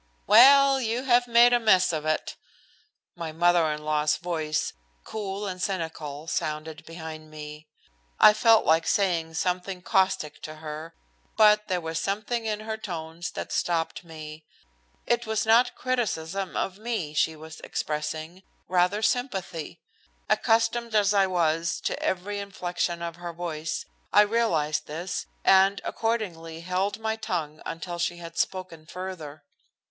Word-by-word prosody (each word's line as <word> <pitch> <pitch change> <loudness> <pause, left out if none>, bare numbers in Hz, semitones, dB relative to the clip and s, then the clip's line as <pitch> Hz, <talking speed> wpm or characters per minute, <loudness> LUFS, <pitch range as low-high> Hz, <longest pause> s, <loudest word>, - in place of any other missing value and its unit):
"Well, 270 +5 +7
you 235 +2 -1
have 245 -2 +3
made 240 +1 +6
a 240 - +5
mess 185 -6 +4
of 155 -1 -3
it!" 155 - -1 0.8
My 165 -2 -5
mother 170 0 +3
in 150 0 -5
law's 150 0 +1
voice, 155 -3 -2 0.3
cool 205 -1 -5
and 185 -2 -5
cynical, 160 -6 -3
sounded 155 -1 -3
behind 160 -1 -8
me. 150 0 -9 0.5
I 210 - +9
felt 225 +1 +5
like 160 +1 +3
saying 170 -5 +1
something 180 +2 -2
caustic 185 -6 +1
to 155 - -7
her, 155 +1 -8 0.4
but 210 -1 +5
there 180 -2 -1
was 160 0 -3
something 215 +3 -2
in 215 -1 -2
her 220 0 -4
tones 170 -4 -6
that - - -5
stopped 165 -1 -1
me. 155 -2 -10 0.6
It 240 -1 0
was 220 0 0
not 240 +3 +4
criticism 195 -7 -2
of 190 +1 -2
me 215 -10 -3
she 160 +1 +1
was 160 +1 -11
expressing, 155 +3 -4 0.3
rather 180 +4 +2
sympathy. 210 - -2 0.5
Accustomed 230 0 +1
as 205 -1 +4
I 195 -1 +4
was 170 -1 0
to - - -2
every 200 +3 -2
inflection 175 -3 -3
of 170 0 -5
her 175 -1 -6
voice, 160 -2 -4 0.3
I 205 - +7
realized 180 -9 +1
this, 170 +5 -4 0.2
and 195 +1 +5
accordingly 175 -8 -3
held 185 +4 -1
my 220 0 -2
tongue 170 -9 -4
until 175 +1 -5
she 175 0 -1
had 170 -1 -9
spoken 185 -4 -3
further. 165 -5 -7
175 Hz, 140 wpm, -26 LUFS, 160-210 Hz, 0.8 s, I